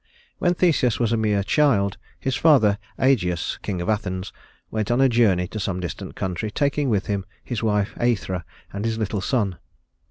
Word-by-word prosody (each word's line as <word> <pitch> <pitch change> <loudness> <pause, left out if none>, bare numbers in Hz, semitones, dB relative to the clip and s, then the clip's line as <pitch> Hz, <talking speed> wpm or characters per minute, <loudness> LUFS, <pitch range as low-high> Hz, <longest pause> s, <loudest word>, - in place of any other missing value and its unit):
When 175 0 +2
Theseus 155 -10 +2
was 115 -2 +1
a - - +3
mere 105 -3 +1
child, 100 -7 +2 0.2
his 135 -1 -1
father 110 -11 +4 0.2
Ægeus, 90 -11 +1
king 95 -3 -3
of 85 - -4
Athens, 95 -3 -2 0.4
went 110 -2 -2
on 120 +1 +2
a 135 - +6
journey 105 -7 +3
to 110 - -5
some 95 -2 -2
distant 90 -2 -6
country, 95 +3 -3
taking 140 +3 0
with 100 -4 +1
him 100 -2 -1 0.2
his 120 -5 -3
wife 105 -2 +1
Æthra 100 -7 0 0.3
and 100 +1 -4
his 115 0 -1
little 105 -2 -2
son. 100 - 0
105 Hz, 180 wpm, -23 LUFS, 95-120 Hz, 0.4 s, a